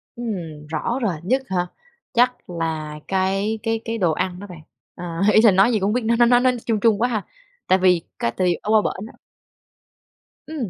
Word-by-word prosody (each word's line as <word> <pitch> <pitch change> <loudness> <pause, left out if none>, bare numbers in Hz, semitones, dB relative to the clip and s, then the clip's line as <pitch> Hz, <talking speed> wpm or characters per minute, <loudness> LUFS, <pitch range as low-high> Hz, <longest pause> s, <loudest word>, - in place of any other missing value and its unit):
Ừm, 170 -11 -6
rõ 165 - -2
rồi 205 -6 0
nhất 260 +8 +1
hả? 180 -1 0 0.5
Chắc 245 -3 +1
là 160 -3 -4
cái 195 +3 0
cái 225 0 0
cái 230 0 -3
đồ 175 -5 +2
ăn 180 +3 -2
đó 205 - -9
bạn. 175 -4 -11 0.4
Ờ, 175 - -7 0.3
ý 215 - +6
là 220 -3 +6
nói 195 +6 +4
gì 215 - +1
cũng 190 - -1
hông 210 - +1
biết 250 -2 0
nữa 230 +1 +2
nó 240 - +7
nó 245 0 +5
nói 250 -1 +2
ch - - -13
chung 220 -3 0
chung 220 -1 +2
quá 245 - +3
ha? 215 -4 -2 0.4
Tại 185 - +4
vì 180 -2 +4 0.2
cái 115 - 0
thì 180 -2 +2
ở 210 - -6
qua 215 -1 +5
bển 200 +1 -4
á - - -16 1.3
Ừm, 285 - -4
205 Hz, 225 wpm, -22 LUFS, 180-230 Hz, 1.3 s, nó